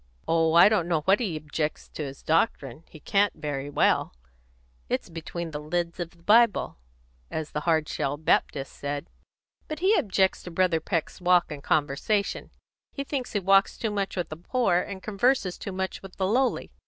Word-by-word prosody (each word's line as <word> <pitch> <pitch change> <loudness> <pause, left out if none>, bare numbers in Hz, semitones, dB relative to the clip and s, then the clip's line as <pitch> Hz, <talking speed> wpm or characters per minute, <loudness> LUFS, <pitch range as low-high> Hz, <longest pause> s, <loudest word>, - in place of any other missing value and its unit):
"Oh, 165 -1 +2
I 170 +3 +8
don't 205 -6 +2
know 160 -3 0
that 195 +2 +4
he 195 -10 -2
objects 150 0 -3
to 155 - -6
his 135 -1 -8
doctrine; 155 - 0
he 155 - -13
can't 200 +5 +1
very 145 -2 -4
well; 145 - +1 0.7
it's - - -2
'between 165 +1 -6
the 150 - -4
leds 170 +3 -3
of 175 -2 -3
the 170 0 -24
Bible,' 225 - +3 0.5
as 155 -1 -4
the 150 - -2
Hard 160 -2 +2
shell 145 -1 -2
Baptist 145 -2 0
said. 145 +3 -5 0.6
But 310 - -4
he 375 +6 +3
objects 190 - +1
to - - -8
Brother 175 -1 +2
Peck's 165 +2 -3
walk 180 -2 +3
and 145 -2 -6
conversation. 155 +9 0 0.4
He 275 - -4
thinks 270 -3 -4
he 205 - +1
walks 195 +1 +3
too 225 - -2
much 200 -1 -2
with 175 - -2
the 155 - -7
poor, 180 0 +1
and 190 0 -6
converses 215 -2 +1
too 200 - -5
much 190 0 -4
with 195 -1 -11
the 190 - -1
lowly. 250 +6 +1
175 Hz, 185 wpm, -26 LUFS, 155-200 Hz, 0.7 s, I